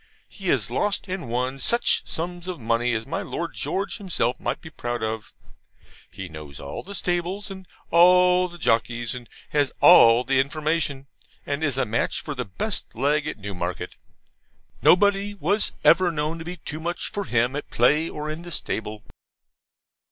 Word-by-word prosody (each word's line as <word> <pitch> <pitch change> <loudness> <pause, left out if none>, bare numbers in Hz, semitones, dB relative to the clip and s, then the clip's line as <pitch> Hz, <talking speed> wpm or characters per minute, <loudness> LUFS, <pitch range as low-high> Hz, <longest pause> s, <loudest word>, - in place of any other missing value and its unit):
He - - -8
has - - +1
lost 205 -1 0
and 185 -9 -4
won 125 +3 -1
such 235 - +2
sums 175 +2 -5
of 180 -4 -4
money 115 +1 +1
as 110 0 -3
my - - -3
Lord - - -4
George 195 +1 -2
himself 165 - -1
might - - -2
be 160 - -11
proud 120 -5 -4
of. 110 -3 -3 0.8
He 95 -2 -7
knows 75 -4 -10
all 70 - -6
the 200 +2 -8
stables, 180 +3 -2
and 190 -1 -9 0.2
all 180 +1 +6
the 175 -1 -12
jockeys, 115 -4 0
and 125 -2 -9 0.2
has 145 -2 +2
all 120 -8 +8
the 130 +1 +2
'information,' 150 0 0 0.4
and 145 +2 -2
is 140 -4 +1
a 135 - +2
match 115 +1 -1
for 150 - -5
the 125 -3 -4
best 185 - -4
Leg 145 +5 +1
at - - -4
Newmarket. 90 -3 -5 0.9
Nobody 200 +2 +4
was 200 +4 +2
ever 175 +1 +5
known 155 +1 -2
to 160 - -7
be 180 +1 -6
'too 155 -1 -7
much' 170 +2 -3
for 205 -2 -3
him 120 0 +1
at 145 - -5
play 150 +7 +3
or 150 0 -5
in 155 +2 -4
the 175 - -9
stable. 110 -9 -4
150 Hz, 175 wpm, -24 LUFS, 120-180 Hz, 0.9 s, all